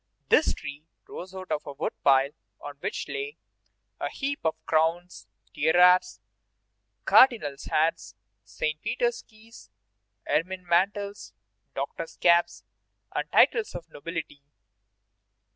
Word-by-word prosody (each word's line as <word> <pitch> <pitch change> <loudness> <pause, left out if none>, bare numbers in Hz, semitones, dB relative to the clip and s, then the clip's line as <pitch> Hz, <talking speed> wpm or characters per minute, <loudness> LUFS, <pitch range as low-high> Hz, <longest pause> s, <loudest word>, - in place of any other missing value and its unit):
This - - +4
tree 145 +3 -9 0.2
rose 185 +1 -9
out 185 0 -8
of 150 - 0
a 145 - -6
wood 140 - -3
pile 135 0 +4 0.3
on 145 -1 -9
which - - -4
lay 425 +1 -5 0.6
a - - -2
heap 280 +1 -3
of 160 -1 0
crowns, 160 - 0 0.3
tiaras, 180 +3 +4 0.9
cardinals' 220 - +4
hats, 155 -9 0 0.3
Saint 155 +8 -3
Peter's 240 -1 -1
keys, 220 - -17 0.6
ermine 185 +3 -1
mantles, 200 +4 0 0.4
doctors' 165 0 -5
caps, 170 0 +3 0.5
and - - -3
titles 450 -3 +3
of 170 - -7
nobility. 145 -2 -6
170 Hz, 110 wpm, -27 LUFS, 150-200 Hz, 0.9 s, This